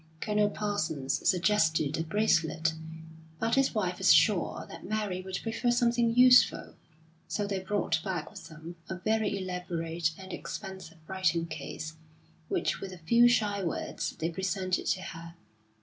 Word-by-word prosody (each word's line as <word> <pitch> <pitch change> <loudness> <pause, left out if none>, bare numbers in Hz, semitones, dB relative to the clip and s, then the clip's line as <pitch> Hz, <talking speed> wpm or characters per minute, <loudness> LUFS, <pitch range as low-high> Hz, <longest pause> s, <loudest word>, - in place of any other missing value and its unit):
Colonel 210 +1 +1
Parsons 160 -11 -1
suggested 165 -6 +2
a - - -1
bracelet, 165 -3 +1 0.6
but 225 +6 -1
his 270 -2 +2
wife 180 -4 -1
was 190 - +5
sure 205 -6 +3
that - - -10
Mary 210 -3 -2
would 185 -1 -4
prefer 230 +2 -1
something 235 -1 +2
useful; 250 0 +5 0.5
so 205 - -2
they 200 -1 -2
brought 190 -4 -1
back 175 -5 -3
with - - -10
them 165 +2 -10
a 190 - -3
very 215 +2 0
elaborate 175 -3 -2
and 190 -1 -9
expensive 190 -5 -7
writing 175 -3 0
case, 155 0 -7 0.5
which - - -1
with 195 - -6
a 185 - -9
few 235 +9 +5
shy 205 -4 +1
words 170 - -3
they 165 +2 -2
presented 190 +1 -1
to 185 - 0
her. 170 -2 -9
185 Hz, 150 wpm, -29 LUFS, 165-210 Hz, 0.6 s, was